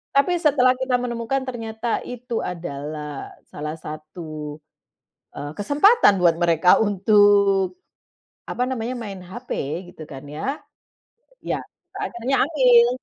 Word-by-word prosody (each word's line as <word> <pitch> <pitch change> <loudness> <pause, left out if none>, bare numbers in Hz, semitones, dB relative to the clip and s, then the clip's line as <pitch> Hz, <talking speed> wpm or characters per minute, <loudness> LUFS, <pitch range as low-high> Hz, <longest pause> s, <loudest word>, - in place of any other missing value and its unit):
Tapi 320 +6 +4
setelah 265 -5 +4
kita 260 -1 0
menemukan, 240 +2 -2
ternyata 225 -2 -3
itu 245 -1 -5
adalah 150 -3 -6 0.2
salah 150 +1 -5
satu, 155 -1 -7 0.8
eee, 145 0 -5
kesempatan 290 - +5
buat 170 -2 +5
mereka 175 +1 +5
untuk, 205 - +4 0.8
apa 250 - -1
namanya, 250 0 -3
main 200 -5 -7
HP, 240 +8 -10 0.4
gitu 155 - -10
kan, 135 -1 -9
ya. 205 - -4 0.8
Ya, - - -2 0.4
saya - - -3
akhirnya 245 +3 0
ambil. 250 -6 +5
210 Hz, 115 wpm, -23 LUFS, 165-250 Hz, 0.8 s, kesempatan